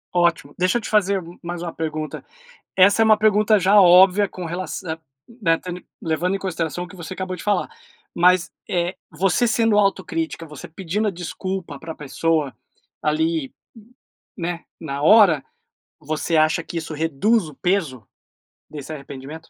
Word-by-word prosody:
Ótimo, 170 -4 +1
deixa 185 +5 +2
eu - - -3
te - - -6
fazer 200 -3 +2
m 170 +1 -13
mais 175 0 -5
uma 170 - -5
pergunta. 155 -2 -4 0.5
Essa 200 +4 +5
é - - +2
uma 215 -1 +6
pergunta 215 0 +4
já 200 +3 +5
óbvia, 190 +2 +6
com 185 - -8
relaçã 175 -1 -4 0.5
eh, 165 0 +4
ten 180 0 -8 0.2
levando 175 +4 0
em - - -3
consideração 175 -2 -3
o - - -8
que 195 - -13
você 175 +1 -7
acabou 185 0 -4
de 170 - -10
falar, 205 -3 0 0.4
mas, 180 0 +3 0.2
eh, 175 -2 -1 0.2
você 195 +9 +1
sendo 225 -1 +2
autocrítica, 180 -5 0
você 150 -3 -10
pedindo 190 +5 -2
a - - +1
desculpa 180 -3 -5
pra 160 0 -7
pessoa, 150 0 -1 0.5
ali, 155 -1 0 0.2
n 225 +2 -17 0.4
né, 170 -1 -4 0.2
na 140 -2 -4
hora, 180 -6 +6 0.6
você 155 +2 -2
acha 155 +1 +3
que 170 - -6
isso 160 -1 -5
reduz 165 +7 +1
o - - -12
peso 160 - -1 0.7
desse 150 +1 -7
arrependimento? 140 0 -8
175 Hz, 165 wpm, -22 LUFS, 160-195 Hz, 0.7 s, uma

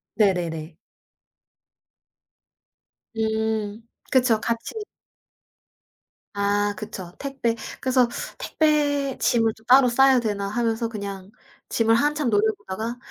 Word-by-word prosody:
네네네. 175 -6 0 2.4
음. 220 -1 -1 0.3
그쵸. 245 -5 +3
같이 230 - -3 1.6
아 205 0 +1
그쵸. 190 -4 -7
택배 270 -5 -2 0.3
그래서 255 -2 +3 0.3
'택배 290 -3 +1
짐을 225 -2 +2
좀 220 - -22
따로 255 +1 +6
싸야 265 +1 +5
되나?' 205 -4 -2
하면서 230 +1 -1
그냥 200 -3 -7 0.4
짐을 225 0 +3
한참 295 0 +1
노려보다가 220 +2 -1
225 Hz, 190 characters per minute, -24 LUFS, 205-250 Hz, 2.4 s, 따로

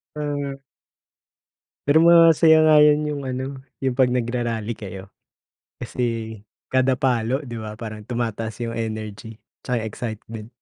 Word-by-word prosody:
Hmm. 145 -2 -4 1.3
Pero 145 +2 +5
masaya 165 -1 +6
nga 155 -1 +6
yun 150 0 +5
yung 150 -1 -3
ano 130 +1 -4 0.2
yung 130 - +2
pag 130 - +6
nagra-rally 120 -2 -2
kayo. 95 -3 -8 0.7
Kasi 115 -3 -4 0.3
kada 130 0 +3
palo 130 +2 0
di 120 -3 -7
ba 105 -1 -7
parang 110 -2 -7
tumataas 115 -2 -3
yung 115 - -4
energy 110 -1 -5 0.2
tsaka 120 -3 -2
yung - - -3
excitement. 110 -1 -7
120 Hz, 130 wpm, -22 LUFS, 110-140 Hz, 1.3 s, masaya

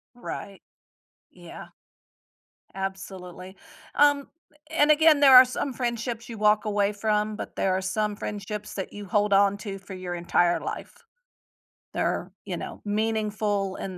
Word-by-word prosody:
Right. 200 -5 -8 0.7
Yeah. - - -11 1.1
Absolutely, 190 -1 -7 0.4
um, 290 -1 +4 0.4
and 305 -1 +4
again, 310 -1 +5
there 275 -2 +7
are 255 - +11
some 255 +2 -3
friendships 235 -1 -3
you 230 - -7
walk 210 +1 +3
away 205 -1 +1
from, 210 0 0
but - - -7
there 190 -1 +1
are 190 - -1
some 210 +2 -1
friendships 210 0 -6
that 190 - -5
you 205 -1 -8
hold 205 +2 +1
on 200 0 +4
to 200 -2 -6
for 190 +1 -11
your 185 -1 -5
entire 175 0 +1
life. - - -6 1.0
They're, - - -1
you - - -4
know, - - -7
meaningful, 210 -2 -1
and 190 -2 -6
210 Hz, 140 wpm, -26 LUFS, 195-225 Hz, 1.1 s, are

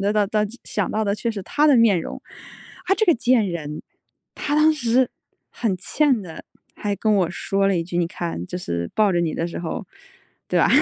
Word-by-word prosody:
得 205 +2 +1 0.5
想 205 -3 -2
到 220 0 0
的 200 0 +1
却 230 +3 -2
是 205 -4 -5
她 295 +9 +2
的 280 - +6
面 220 -6 +4
容。 - - -7 0.7
“啊， 385 - +4
这 440 - +2
个 340 - +6
贱 245 -4 +2
人。 155 -3 -5 0.5
他 290 - -1
当 310 +1 +5
时 255 -3 +2 0.4
很 210 -6 -1
欠 265 - +2
的， 165 -4 -10 0.3
还 205 -1 -3
跟 215 0 +2
我 185 -4 +2
说 195 +1 0
了 195 - +2
一 165 - -2
句： 175 0 -5
“你 170 - +2
看， 170 - -4
就 180 - -5
是 85 - -3
抱 210 -3 +3
着 175 - +2
你 165 -2 0
的 165 - -2
时 170 - -6
候， 165 -2 -4 0.6
对 - - +1
吧？ - - +4
200 Hz, 220 characters per minute, -22 LUFS, 175-240 Hz, 0.7 s, 的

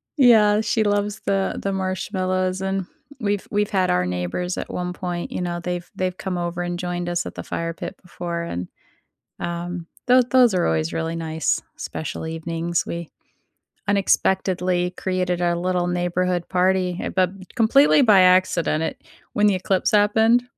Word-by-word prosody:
Yeah, 220 -6 +6
she 220 +1 +1
loves 205 0 0
the 195 -1 0
the 195 - -1
marshmallows, 185 0 -1
and 190 -1 -1 0.3
we've 205 -3 -1
we've 210 0 +1
had 190 -3 +1
our 90 0 +2
neighbors 90 - -2
at - - -5
one 180 0 -3
point, 175 -1 -4
you - - -3
know, 175 -1 -2
they've 175 0 -4
they've 185 0 -2
come 185 -2 -3
over 175 0 -3
and 175 0 -3
joined 175 0 -3
us 175 0 -1
at - - -7
the - - -6
fire 165 0 -3
pit - - -7
before, 170 -2 -5
and, 90 - -4 0.7
um, 175 0 -4 0.2
tho 250 0 +6
those 245 -3 +4
are 180 - +2
always 80 0 0
really 165 0 -2
nice, 160 -1 -1 0.2
special 160 +1 -5
evenings. 165 +1 -2
We 170 -1 -5 0.8
unexpectedly 185 -2 +1
created 180 -1 -1
our 175 -1 +2
little 180 0 0
neighborhood 175 0 0
party, 185 0 +2
ha - - -3
but 185 -1 +1 0.2
completely 275 +5 +5
by 210 -6 +6
accident, 180 -3 +3
it - - -4 0.3
When 210 0 +3
the 200 - +3
eclipse 185 0 0
happened 220 +3 +4
180 Hz, 165 wpm, -22 LUFS, 175-195 Hz, 0.8 s, Yeah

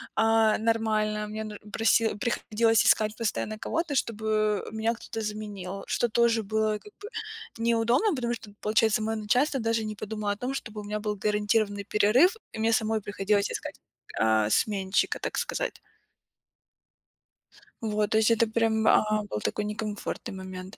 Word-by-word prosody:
а, 225 -1 +4
нормально. 215 -2 0
Мне, 215 +1 -5
ну, 210 -1 -7 0.2
проси 225 0 +2
приходилось 225 0 +1
искать 215 0 +3
постоянно 215 -1 -2
кого-то, 330 -3 -2
чтобы 215 -3 0
меня 220 +1 0
кто-то 225 0 -6
заменил, 205 -3 -5
что 240 - +1
тоже 235 0 +3
было 215 +1 0
как 420 - -16
бы 425 - -7 0.5
неудобно, 235 - +2
потому 240 -1 -1
что, 220 -3 -8
получается, 215 0 +2
моё 220 0 -1
начальство 255 +6 +1
даже 225 -1 0
не 215 0 -4
подумало 210 0 -3
о - - -10
том, 255 +3 -3
чтобы 215 -5 -6
у - - -10
меня 210 +1 -3
был 210 -1 -2
гарантированный 210 0 0
перерыв, 245 - +4 0.2
и - - -6
мне 225 +1 +2
самой 220 0 +1
приходилось 205 0 0
искать, - - -5 0.4
а, 110 -1 +3
сменщика, 195 - +1
так - - -4
сказать. - - -2 2.0
Вот, 210 -1 -1
то 220 - +3
есть 220 +1 +4
это 230 0 +4
прям, 220 -1 +1
а, 215 0 +3
был - - -2
такой 210 - -2
некомфортный 210 -1 -4
момент. 185 +1 -8
215 Hz, 155 wpm, -27 LUFS, 210-225 Hz, 2.0 s, а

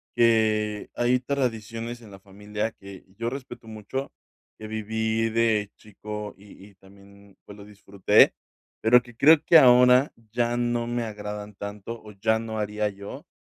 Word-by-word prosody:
que 110 -3 +2
hay 120 +1 +2
tradiciones 120 -3 -3
en 110 - -14
la 95 - -12
familia 105 +3 -5
que 100 -3 -13
yo 115 0 -1
respeto 120 -3 -9
mucho, 110 +5 -6 0.5
que 110 - -10
viví 110 +1 -1
de 110 -2 +1
chico 105 0 -8
y 100 0 -16
y - - -22
también, 100 +1 -19
pues, 100 - -12
lo 100 - -12
disfruté, 100 -2 +3 0.5
pero 120 +2 +5
que 120 -1 -16
creo 150 +5 +5
que 165 - +8
ahora 125 +1 +6 0.2
ya 120 +1 0
no 120 -1 -1
me 120 0 -2
agradan 105 -1 -7
tanto 105 +3 -7
o 105 -1 -12
ya 110 +3 0
no 110 -1 -6
haría 105 0 -1
yo, 100 0 -10
110 Hz, 155 wpm, -25 LUFS, 105-120 Hz, 0.5 s, que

